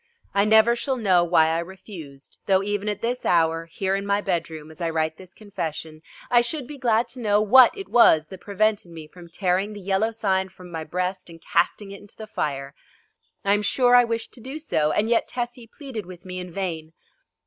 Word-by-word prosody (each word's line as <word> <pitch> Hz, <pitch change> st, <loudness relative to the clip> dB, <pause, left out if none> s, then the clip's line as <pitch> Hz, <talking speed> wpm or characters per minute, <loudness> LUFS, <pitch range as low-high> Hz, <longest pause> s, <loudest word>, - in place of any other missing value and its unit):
I 200 Hz, 0 st, +3 dB
never 220 Hz, +2 st, +5 dB
shall 260 Hz, +2 st, -2 dB
know 185 Hz, -6 st, +3 dB
why 165 Hz, -2 st, +4 dB
I 165 Hz, +1 st, 0 dB
refused, 170 Hz, -6 st, -10 dB
though 190 Hz, -1 st, +3 dB
even 205 Hz, +1 st, -2 dB
at 210 Hz, +1 st, -4 dB
this 245 Hz, +2 st, -2 dB
hour, 165 Hz, -1 st, +2 dB
here 190 Hz, +4 st, -2 dB
in 195 Hz, -, -2 dB
my 200 Hz, 0 st, +1 dB
bedroom 160 Hz, -5 st, -3 dB
as 160 Hz, -, -14 dB
I 165 Hz, -, 0 dB
write 160 Hz, -1 st, -1 dB
this 185 Hz, -1 st, -14 dB
confession, 160 Hz, -6 st, -6 dB, 0.3 s
I 240 Hz, -1 st, +6 dB
should 260 Hz, +3 st, -3 dB
be 285 Hz, +2 st, -10 dB
glad 235 Hz, -2 st, +2 dB
to 255 Hz, -, -10 dB
know 210 Hz, -3 st, +2 dB
what 245 Hz, -, +6 dB
it 390 Hz, -, -7 dB
was 160 Hz, -10 st, +5 dB
that 185 Hz, +3 st, -12 dB
prevented 205 Hz, -2 st, 0 dB
me 160 Hz, -2 st, -9 dB
from 170 Hz, +2 st, -14 dB
tearing 185 Hz, +3 st, -1 dB
the 205 Hz, -, -8 dB
Yellow 195 Hz, +3 st, 0 dB
Sign 190 Hz, -4 st, -1 dB
from 180 Hz, -1 st, -14 dB
my 160 Hz, -1 st, -4 dB
breast 180 Hz, +3 st, -3 dB
and 165 Hz, -1 st, -12 dB
casting 195 Hz, +5 st, 0 dB
it 200 Hz, -, -10 dB
into 205 Hz, -, -17 dB
the 220 Hz, -, -7 dB
fire. 140 Hz, -9 st, -4 dB, 0.7 s
I 200 Hz, -, +4 dB
am 205 Hz, -, +2 dB
sure 245 Hz, +4 st, +3 dB
I 245 Hz, -, +8 dB
wished 230 Hz, -1 st, -3 dB
to 245 Hz, -, -14 dB
do 265 Hz, +5 st, -7 dB
so, 155 Hz, -, 0 dB
and 210 Hz, -, +1 dB
yet 235 Hz, 0 st, +2 dB
Tessie 240 Hz, -1 st, -5 dB
pleaded 255 Hz, -, -8 dB
with 180 Hz, -1 st, -12 dB
me 185 Hz, 0 st, -6 dB
in 180 Hz, -1 st, -7 dB
vain. 165 Hz, -4 st, -4 dB
195 Hz, 215 wpm, -24 LUFS, 170-220 Hz, 0.7 s, I